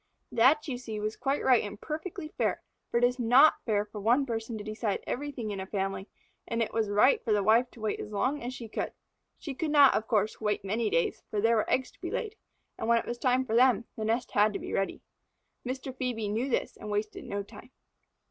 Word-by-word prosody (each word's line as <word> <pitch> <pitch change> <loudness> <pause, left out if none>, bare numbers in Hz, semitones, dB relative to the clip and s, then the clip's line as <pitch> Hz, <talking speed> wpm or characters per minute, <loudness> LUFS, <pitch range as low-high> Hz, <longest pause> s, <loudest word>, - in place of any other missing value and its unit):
That, 275 +7 +4
you 250 -4 -3
see, 220 -4 -5
was 215 +1 -2
quite 275 +2 -1
right 255 -3 +5
and 205 0 -7
perfectly 315 0 -5
fair, - - -1 0.3
for - - 0
it 240 - +1
is 250 +1 +2
not 250 +6 +5
fair 210 -2 +1
for 210 0 -8
one 245 +7 +3
person 225 -2 -4
to 210 - -6
decide 215 -1 -2
everything 255 -5 -4
in 200 - -4
a 190 - -5
family, 195 -1 -3 0.4
and 230 - -2
it 230 - -1
was 220 -2 0
right 210 +7 +4
for 230 - -1
the 205 -1 +3
wife 230 +4 +4
to 235 - -15
wait 215 -1 -1
as 210 - -6
long 260 +8 0
as 245 - -4
she 245 -3 -8
could. - - -4 0.4
She 290 - -6
could 310 +4 -2
not, 290 -2 +7
of 220 - -1
course, 215 0 0
wait 210 -2 -1
many 215 +3 0
days, 165 - 0
for 210 - -2
there 225 +2 +3
were 215 - 0
eggs 260 - +1
to - - -28
be - - -4
laid, 440 -1 -3 0.4
and - - -3
when 235 0 +5
it - - -1
was 240 0 -5
time 255 0 +2
for 225 - -4
them, 240 -2 +4
the 220 - -4
nest 230 +3 -1
had 210 +1 +3
to - - -3
be - - -6
ready. 195 - -1 0.6
Mr. 260 +1 -5
Phœbe 235 -5 -2
knew 235 +6 -1
this - - -1
and 210 - -8
wasted 210 +1 -2
no 200 0 -4
time. 205 +3 -13
230 Hz, 240 wpm, -29 LUFS, 210-255 Hz, 0.6 s, not